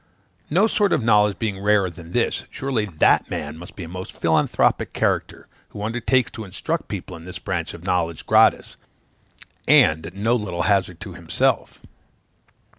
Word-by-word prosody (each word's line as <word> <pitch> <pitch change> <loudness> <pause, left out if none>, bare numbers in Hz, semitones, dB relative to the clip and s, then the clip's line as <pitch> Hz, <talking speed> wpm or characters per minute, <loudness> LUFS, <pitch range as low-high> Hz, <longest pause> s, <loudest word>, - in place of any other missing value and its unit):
No 185 +8 +4
sort 210 -3 +2
of - - +1
knowledge 105 -3 +3
being 105 -4 -3
rarer 100 -1 +3
than 85 -1 -11
this, - - 0
surely 130 -6 -2
that 85 -7 +2
man 75 +1 -4
must 90 +6 -12
be 95 - -7
a - - -7
most 90 +2 -7
philanthropic 80 -1 +1
character, - - -1 0.2
who 105 - -7
undertakes 125 +2 0
to 110 - -7
instruct 95 - -4
people 90 - -6
in 80 0 -11
this 90 0 -7
branch 85 -3 -4
of 85 - -12
knowledge 85 -4 -1
gratis, - - +3 0.9
and 80 +1 +4
at 85 - -11
no 110 +4 +1
little 90 -7 -2
hazard 95 -4 +1
to - - -7
himself. - - -1
95 Hz, 165 wpm, -22 LUFS, 85-110 Hz, 0.9 s, No